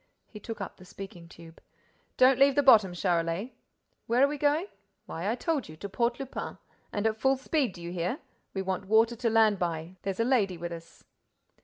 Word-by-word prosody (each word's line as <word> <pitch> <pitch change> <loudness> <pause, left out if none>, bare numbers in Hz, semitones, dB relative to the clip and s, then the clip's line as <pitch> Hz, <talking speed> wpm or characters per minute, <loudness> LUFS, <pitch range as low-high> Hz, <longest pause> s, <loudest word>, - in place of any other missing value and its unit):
He 210 - -11
took 225 +1 -7
up 195 - -6
the - - -14
speaking 180 -3 -10
tube: 165 -1 -14 0.6
"Don't 255 0 +5
leave 275 0 +5
the 285 - +3
bottom, 220 -8 +7
Charolais. 175 +4 -1 0.5
Where 240 +3 +3
are - - +6
we 290 0 -4
going? 295 +5 +2 0.4
Why, 170 +5 -4
I 230 - +1
told 290 - -2
you: 155 - -10
to 200 - -6
Port 235 +5 -1
Lupin. 270 -1 -6 0.3
And 205 +1 -2
at 220 0 0
full 265 0 +3
speed, 270 - 0
do 170 - -11
you 170 - -5
hear? 180 +8 -2 0.4
We 190 - -1
want 190 -1 -3
water 225 +3 +4
to 235 0 0
land 220 -3 +4
by—there's 175 +3 -4
a 230 - +2
lady 210 -8 +2
with 170 +1 -5
us." 165 0 -10
210 Hz, 200 wpm, -29 LUFS, 175-255 Hz, 0.6 s, bottom